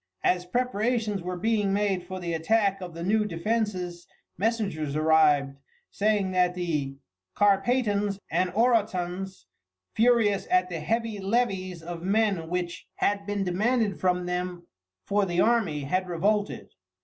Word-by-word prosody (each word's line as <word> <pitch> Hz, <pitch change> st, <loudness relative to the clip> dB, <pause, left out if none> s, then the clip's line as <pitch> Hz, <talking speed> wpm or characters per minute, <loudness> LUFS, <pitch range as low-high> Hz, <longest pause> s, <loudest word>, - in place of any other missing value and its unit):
As 180 Hz, 0 st, +1 dB
preparations 225 Hz, -2 st, 0 dB
were 180 Hz, +1 st, -4 dB
being 210 Hz, 0 st, +1 dB
made 200 Hz, -3 st, 0 dB
for 185 Hz, 0 st, -5 dB
the 170 Hz, -2 st, -3 dB
attack 195 Hz, +4 st, +1 dB
of 175 Hz, -2 st, -7 dB
the 170 Hz, -, -5 dB
new 215 Hz, +4 st, +2 dB
defences 185 Hz, -2 st, -2 dB, 0.3 s
messengers 195 Hz, -9 st, -1 dB
arrived 150 Hz, -3 st, +3 dB, 0.3 s
saying 205 Hz, -2 st, +1 dB
that 180 Hz, -1 st, +2 dB
the 150 Hz, -6 st, -2 dB, 0.4 s
Carpatans 205 Hz, 0 st, +2 dB
and 180 Hz, +2 st, +1 dB
Orotans, 195 Hz, -5 st, 0 dB, 0.5 s
furious 225 Hz, -3 st, +3 dB
at 185 Hz, 0 st, +3 dB
the 170 Hz, -2 st, -4 dB
heavy 225 Hz, +6 st, -2 dB
levies 190 Hz, -5 st, -1 dB
of 170 Hz, 0 st, -6 dB
men 195 Hz, -3 st, +1 dB
which 175 Hz, -1 st, -3 dB
had 200 Hz, 0 st, 0 dB
been 205 Hz, -1 st, -1 dB
demanded 210 Hz, +3 st, 0 dB
from 180 Hz, -1 st, +1 dB
them 180 Hz, -1 st, -3 dB, 0.4 s
for 205 Hz, 0 st, +1 dB
the 175 Hz, 0 st, -1 dB
army, 215 Hz, -10 st, +2 dB
had 185 Hz, +7 st, -1 dB
revolted. 205 Hz, +4 st, -1 dB
190 Hz, 135 wpm, -27 LUFS, 175-210 Hz, 0.5 s, arrived